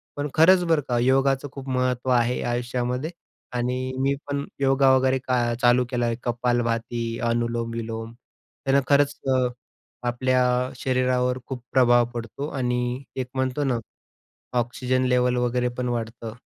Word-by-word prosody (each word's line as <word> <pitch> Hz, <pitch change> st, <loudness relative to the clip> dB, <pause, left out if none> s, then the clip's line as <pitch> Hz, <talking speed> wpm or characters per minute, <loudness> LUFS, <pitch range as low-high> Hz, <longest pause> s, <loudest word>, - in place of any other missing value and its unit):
पण 145 Hz, 0 st, -2 dB
खरंच 180 Hz, +3 st, +6 dB
बरं 165 Hz, -3 st, +3 dB
का, 120 Hz, -, +1 dB
योगाचं 135 Hz, +2 st, +2 dB
खूप 135 Hz, 0 st, -8 dB
महत्त्व 125 Hz, 0 st, 0 dB
आहे 120 Hz, 0 st, +2 dB
आयुष्यामध्ये 125 Hz, +3 st, -2 dB, 0.5 s
आणि 125 Hz, +1 st, -1 dB, 0.2 s
मी 135 Hz, +1 st, +2 dB, 0.2 s
पण 140 Hz, 0 st, -2 dB
योगा 135 Hz, -1 st, +4 dB
वगैरे 130 Hz, 0 st, +2 dB
का 120 Hz, -2 st, +1 dB
चालू 125 Hz, 0 st, +4 dB
केला 120 Hz, -2 st, 0 dB
आहे. 115 Hz, -1 st, 0 dB
कपालभाती, 120 Hz, -1 st, -1 dB
अनुलोम 115 Hz, 0 st, -1 dB
विलोम, 115 Hz, 0 st, -5 dB, 0.5 s
त्यानं 135 Hz, +1 st, +4 dB
खरंच 145 Hz, 0 st, +3 dB, 0.2 s
अ, 130 Hz, -1 st, +2 dB, 0.6 s
आपल्या 130 Hz, +1 st, +2 dB, 0.3 s
शरीरावर 125 Hz, -1 st, +1 dB
खूप 125 Hz, -3 st, -6 dB
प्रभाव 120 Hz, -2 st, +5 dB
पडतो. 120 Hz, +5 st, -5 dB
आणि 125 Hz, -2 st, -1 dB
एक 130 Hz, -1 st, -2 dB
म्हणतो 130 Hz, +2 st, -1 dB
ना, 130 Hz, -3 st, +1 dB, 0.8 s
ऑक्सिजन 125 Hz, +2 st, 0 dB
लेव्हल 125 Hz, 0 st, +2 dB
वगैरे 125 Hz, 0 st, +1 dB
पण 125 Hz, -1 st, -1 dB
वाढतं. 115 Hz, -1 st, -4 dB
125 Hz, 140 wpm, -24 LUFS, 120-130 Hz, 0.8 s, खरंच